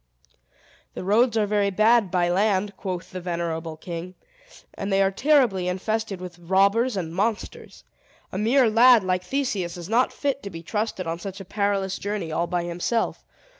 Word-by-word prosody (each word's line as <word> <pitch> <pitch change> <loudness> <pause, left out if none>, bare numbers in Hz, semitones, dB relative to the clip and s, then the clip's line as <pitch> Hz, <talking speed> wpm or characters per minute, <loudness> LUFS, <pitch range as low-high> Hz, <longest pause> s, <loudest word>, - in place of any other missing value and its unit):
"The - - -5
roads 225 +4 +3
are 215 - +3
very 205 -1 +1
bad 215 +1 +3
by 175 -1 +1
land," 200 +2 +1
quoth 185 -2 -5
the 185 - -6
venerable 165 -2 -3
king; 175 +2 -7 0.6
"and 195 +1 -4
they 195 - +3
are 195 0 +3
terribly 235 -6 +2
infested 205 +2 -2
with 180 -1 -9
robbers 200 +6 +2
and 165 -3 -4
monsters. 210 +4 -3 0.5
A - - -4
mere 240 +4 +4
lad, 230 0 +6
like 185 -1 0
Theseus, 195 -7 -2
is 170 -1 -7
not 240 +3 +3
fit 280 -1 -2
to 200 - -6
be 165 -2 -9
trusted 210 0 -3
on 165 +1 -3
such 195 +2 -7
a 195 - -8
perilous 195 -1 -1
journey, 200 -5 -3
all 170 +2 -1
by 175 0 -1
himself. 175 +7 -2
195 Hz, 170 wpm, -24 LUFS, 180-220 Hz, 0.6 s, lad